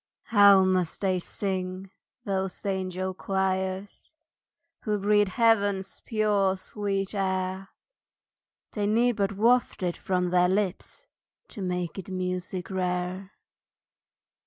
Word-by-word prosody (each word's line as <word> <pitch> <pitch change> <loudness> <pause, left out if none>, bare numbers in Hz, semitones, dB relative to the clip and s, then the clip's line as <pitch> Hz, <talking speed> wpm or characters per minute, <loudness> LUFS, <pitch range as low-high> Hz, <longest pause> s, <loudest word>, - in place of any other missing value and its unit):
HOW 200 -3 +6
must 185 -3 0
they 190 -2 +1
sing, 185 0 -4 0.3
those 190 -1 -3
angel 185 -1 -2
choirs, 190 +1 -2 0.7
Who 210 -2 -1
breathe 205 +1 +3
Heaven's 200 -2 +1
pure, 210 -3 +1
sweet 195 0 -3
air! 190 -1 -2 1.0
They 205 -2 -1
need 235 +3 +3
but 200 -1 0
waft 235 0 +2
it 175 -1 0
from 180 -1 -1
their 180 0 +4
lips 190 -1 -2 0.4
To 210 - -8
make 180 0 -3
it 190 - -8
music 185 0 -4
rare. 180 +1 -2
190 Hz, 110 wpm, -27 LUFS, 185-205 Hz, 1.0 s, HOW